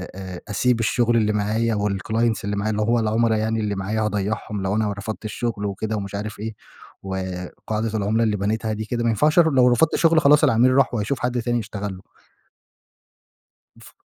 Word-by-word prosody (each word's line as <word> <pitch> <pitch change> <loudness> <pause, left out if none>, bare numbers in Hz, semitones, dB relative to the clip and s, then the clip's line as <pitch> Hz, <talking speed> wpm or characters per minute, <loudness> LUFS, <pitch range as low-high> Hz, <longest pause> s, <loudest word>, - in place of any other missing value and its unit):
أ 95 -2 -7
أسيب 120 +3 +1
الشغل 115 +2 +2
اللي 105 -1 +2
معايا 110 +2 0
والclients 105 +3 0
اللي 100 0 -2
معايا، 105 +2 -1
اللي 105 0 -1
هو 115 +2 +2
العملا 110 0 +1
يعني 110 +1 -1
اللي 105 -2 -1
معايا 105 +3 -2
هاضيّعهم 105 0 -2
لو 95 +2 0
أنا 105 -2 0
رفضت 105 +2 -6
الشغل 110 -1 -3
وكده 110 +2 -3
ومش 100 -1 -5
عارف 105 0 -5
إيه، 110 0 -4 0.5
وقاعدة 95 +4 -4
العملا 110 +3 +1
اللي 105 -2 +1
بنيتها 110 +2 -1
دي 110 0 -4
كده 120 +1 -2
ما 115 - +2
ينفعش 150 +9 +3
ر 160 -2 +5
لو 125 -2 +5
رفضت 125 +6 +3
شغل 165 -1 +4
خلاص 150 +2 +5
العميل 130 -1 +4
راح 135 -2 +3
وهيشوف 115 +4 -1
حد 125 -1 -1
تاني 120 0 0
يشتغل 100 -2 -5
له. - - -14 1.8
ف - - -15
110 Hz, 190 wpm, -22 LUFS, 100-115 Hz, 1.8 s, ر